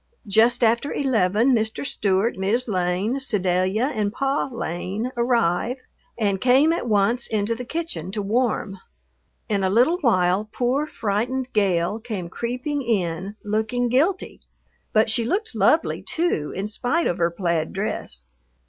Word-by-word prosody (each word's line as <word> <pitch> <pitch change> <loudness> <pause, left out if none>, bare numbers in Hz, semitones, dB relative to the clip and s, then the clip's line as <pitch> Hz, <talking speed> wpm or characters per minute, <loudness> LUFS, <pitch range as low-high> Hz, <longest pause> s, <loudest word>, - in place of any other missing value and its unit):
Just 230 +4 +3
after 235 +5 +2
eleven 230 -2 +2
Mr. 220 +3 -1
Stewart, 200 -1 +1
Mis' 210 +7 0
Lane, 190 +5 0
Sedalia, 195 +1 +1
and 210 -2 -1
Pa 275 +4 -1
Lane 205 +2 -4
"arriv" 235 -1 +1 0.4
and 200 -4 0
came 270 +6 +4
at 290 - -3
once 215 +4 +2
into 215 +1 0
the 250 +2 -6
kitchen 315 - -4
to 210 - -2
warm. 215 -2 -1 0.7
In 200 -2 0
a 190 - +2
little 250 - +3
while 195 - +2
poor, 260 +5 0
frightened 245 +3 -2
Gale 195 -1 +1
came 210 -7 -5
creeping 250 - -3
in, 195 -4 -2
looking 220 +4 -1
guilty. 320 +10 0 0.5
But 220 0 +3
she 230 - +3
looked 425 - -2
lovely, - - +2
too, 320 - -1
in 195 - -3
spite 245 +10 0
of 175 - -1
her 170 0 +3
plaid 170 -2 -1
dress. 125 - -4
220 Hz, 140 wpm, -23 LUFS, 195-250 Hz, 0.7 s, came